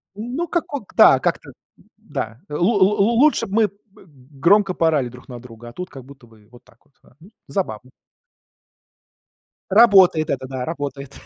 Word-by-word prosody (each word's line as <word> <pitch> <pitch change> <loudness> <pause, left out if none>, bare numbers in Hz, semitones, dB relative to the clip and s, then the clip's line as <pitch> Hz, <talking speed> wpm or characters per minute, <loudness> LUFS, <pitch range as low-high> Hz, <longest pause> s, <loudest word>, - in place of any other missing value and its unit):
Ну 245 +11 -5
как 335 -3 -3
ок 250 -9 -7
да, - - +6
как-то, - - -3 0.5
да. 110 +2 -7
Лу 150 +2 -5
лу 200 +1 +3
лу 225 - +2
лучше 300 +2 +3
б 195 - -13
мы 220 -1 +3
п 200 - -22 0.7
громко 195 +2 +3
поорали 155 -8 0
друг 125 +1 -15
на 120 -1 -8
друга, 120 -1 -13
а 120 - -15
тут 180 0 -7
как 135 -3 -12
будто 135 -3 -16
бы 110 -2 -22
вот 120 - -18
так - - -25
вот. 145 - -35
А, - - -24
ну 185 +7 -18 0.2
забавно. 130 - -4 1.8
Работает 190 -7 +5
это, 130 -1 -3
да, 130 -1 -5
работает. 140 -3 -6
155 Hz, 175 wpm, -20 LUFS, 125-205 Hz, 1.8 s, да